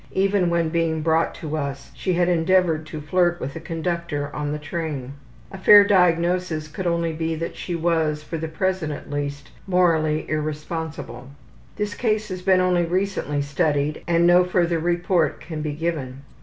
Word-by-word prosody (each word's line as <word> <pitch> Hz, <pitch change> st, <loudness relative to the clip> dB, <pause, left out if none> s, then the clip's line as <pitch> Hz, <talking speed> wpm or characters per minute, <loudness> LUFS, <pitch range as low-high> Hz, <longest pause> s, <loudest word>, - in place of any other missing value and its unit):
Even 195 Hz, -2 st, +2 dB
when 170 Hz, -1 st, +1 dB
being 160 Hz, -1 st, 0 dB
brought 165 Hz, 0 st, +1 dB
to 155 Hz, -1 st, -5 dB
us 140 Hz, -2 st, -4 dB
she 185 Hz, -, -2 dB
had 175 Hz, 0 st, +2 dB
endeavored 170 Hz, -2 st, +2 dB
to 155 Hz, 0 st, -6 dB
flirt 175 Hz, +3 st, +1 dB
with 140 Hz, -, -5 dB
a -, -, -4 dB
conductor 165 Hz, -3 st, -3 dB
on 145 Hz, -1 st, -2 dB
the 150 Hz, -, -2 dB
train. 150 Hz, -4 st, -5 dB, 0.4 s
A 195 Hz, -, -8 dB
fair 205 Hz, +2 st, +9 dB
diagnosis 175 Hz, -3 st, +2 dB
could 175 Hz, +4 st, -4 dB
only 170 Hz, -1 st, 0 dB
be 160 Hz, 0 st, -2 dB
that 165 Hz, +1 st, -5 dB
she 175 Hz, -, -4 dB
was, 160 Hz, -2 st, 0 dB
for 165 Hz, +1 st, -5 dB
the 160 Hz, -, -3 dB
present 180 Hz, 0 st, -1 dB
at 145 Hz, -, -8 dB
least, 145 Hz, -1 st, -4 dB, 0.2 s
morally 165 Hz, -4 st, +2 dB
irresponsible. 155 Hz, -4 st, -4 dB, 0.5 s
This 210 Hz, 0 st, -2 dB
case 215 Hz, -2 st, -1 dB
has 185 Hz, -1 st, -5 dB
been 185 Hz, 0 st, +4 dB
only 180 Hz, -1 st, +2 dB
recently 175 Hz, -5 st, -1 dB
studied 145 Hz, 0 st, 0 dB
and 170 Hz, 0 st, +3 dB
no 175 Hz, +1 st, +6 dB
further 175 Hz, -2 st, +1 dB
report 175 Hz, -1 st, +1 dB
can 155 Hz, -1 st, -6 dB
be 150 Hz, -1 st, -3 dB
given. 145 Hz, -5 st, -4 dB
165 Hz, 170 wpm, -23 LUFS, 155-180 Hz, 0.5 s, fair